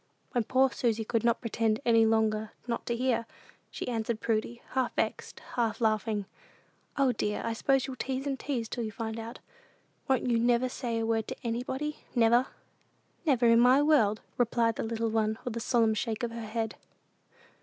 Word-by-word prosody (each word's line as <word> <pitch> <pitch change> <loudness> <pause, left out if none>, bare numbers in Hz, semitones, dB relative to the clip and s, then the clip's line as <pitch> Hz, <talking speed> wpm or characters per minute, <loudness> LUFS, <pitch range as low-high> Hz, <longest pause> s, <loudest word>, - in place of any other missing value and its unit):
When 240 -4 0
poor 260 +2 +3
Susy 225 -3 0
could 230 0 0
not 235 0 +2
pretend 225 -2 0
any 230 -2 +5
longer 220 -1 +1
not 235 -1 -3
to 235 - 0
hear, 240 -2 0 0.4
she - - -6
answered 230 -2 -2
Prudy, 230 +1 -2
half 260 -2 0
vexed, - - -2
half 225 -3 0
laughing, 215 -2 0 0.7
"O, 275 -2 +4
dear, 210 -3 -2
I 230 - -1
s'pose 270 +3 +2
you'll 265 -2 -6
tease 265 +2 -3
and 275 -2 -2
tease 245 -6 -2
till 240 +1 -4
you 215 - -4
find 220 +1 -4
out. 230 +2 -7 0.7
Won't 265 -2 +2
you 235 -2 +2
never 240 +2 +2
say 235 -2 -3
a 225 - 0
word 225 -1 0
to - - -4
anybody, 260 +6 -3 0.2
never?" 240 +2 +4 0.8
"Never 255 -4 +3
in 230 0 +6
my 255 +4 +6
world," 225 -9 +3 0.2
replied 235 -1 +2
the - - -3
little 225 0 -1
one, 220 0 +1
with 245 -2 -3
a - - -2
solemn 225 -1 +2
shake 220 +1 -2
of 235 - -1
her 230 -1 -6
head. 225 0 -3
230 Hz, 185 wpm, -29 LUFS, 225-245 Hz, 0.8 s, in